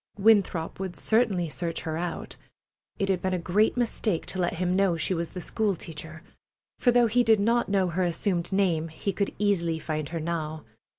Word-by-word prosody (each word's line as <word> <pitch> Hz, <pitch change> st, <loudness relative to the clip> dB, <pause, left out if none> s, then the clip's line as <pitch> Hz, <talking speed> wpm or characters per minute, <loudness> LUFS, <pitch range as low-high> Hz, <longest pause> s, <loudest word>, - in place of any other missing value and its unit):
Winthrop 195 Hz, -6 st, +3 dB
would 190 Hz, -2 st, -4 dB
certainly 210 Hz, -2 st, +1 dB
search 165 Hz, +1 st, -3 dB
her 160 Hz, -2 st, -3 dB
out. 170 Hz, 0 st, -4 dB, 0.6 s
It 195 Hz, -, 0 dB
had 185 Hz, -2 st, +1 dB
been 185 Hz, 0 st, 0 dB
a -, -, 0 dB
great 195 Hz, +7 st, +2 dB
mistake 220 Hz, -6 st, 0 dB
to 190 Hz, -, -5 dB
let 175 Hz, -1 st, 0 dB
him 180 Hz, +1 st, 0 dB
know 190 Hz, -3 st, +2 dB
she 160 Hz, +4 st, 0 dB
was 170 Hz, -1 st, -2 dB
the 185 Hz, -, -7 dB
school 205 Hz, +3 st, 0 dB
teacher, 160 Hz, 0 st, -8 dB, 0.6 s
for 250 Hz, -, +3 dB
though 240 Hz, 0 st, +5 dB
he 240 Hz, +2 st, +3 dB
did 220 Hz, -2 st, +4 dB
not 230 Hz, +3 st, +2 dB
know 195 Hz, -2 st, +2 dB
her 175 Hz, +2 st, -1 dB
assumed 175 Hz, +1 st, -1 dB
name 180 Hz, -5 st, +1 dB
he 165 Hz, +5 st, -4 dB
could 200 Hz, +2 st, -1 dB
easily 175 Hz, -6 st, +1 dB
find 155 Hz, -2 st, -3 dB
her 165 Hz, -, -3 dB
now. 155 Hz, -1 st, -3 dB
180 Hz, 195 wpm, -27 LUFS, 165-205 Hz, 0.6 s, though